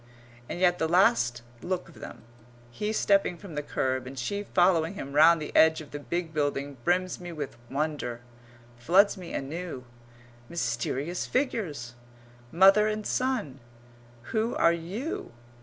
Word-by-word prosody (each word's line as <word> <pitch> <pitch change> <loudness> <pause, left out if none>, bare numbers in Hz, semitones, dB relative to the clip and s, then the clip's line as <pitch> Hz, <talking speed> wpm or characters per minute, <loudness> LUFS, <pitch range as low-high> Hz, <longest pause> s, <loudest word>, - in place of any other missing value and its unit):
And - - -4
yet 180 -1 +3
the 160 - +1
last 120 -9 +3 0.2
look 180 0 -3
of 170 - -15
them - - -10 0.5
he 210 - -3
stepping 200 -4 +2
from 190 -2 -11
the 150 - -2
kerb 130 -3 -2
and 135 +1 -9
she 200 +12 -2
following 175 -2 +2
him 140 -6 -7
round 160 +3 +6
the 150 - -7
edge 160 0 +6
of 150 -2 -11
the 145 - -5
big 170 +2 -4
building 145 -2 -2
brims 185 +3 0
me 175 -1 -7
with 150 -4 -6
wonder 140 -4 -3 0.6
floods 185 - +4
me 180 -3 -9
anew. 150 -2 -5 0.6
Mysterious 140 +3 -2
figures! 170 - -2 0.6
Mother 195 +5 +6
and 215 0 -3
son. 240 - -1 0.7
Who 225 +1 0
are 170 - +4
you? 185 - -5
170 Hz, 145 wpm, -28 LUFS, 140-190 Hz, 0.7 s, round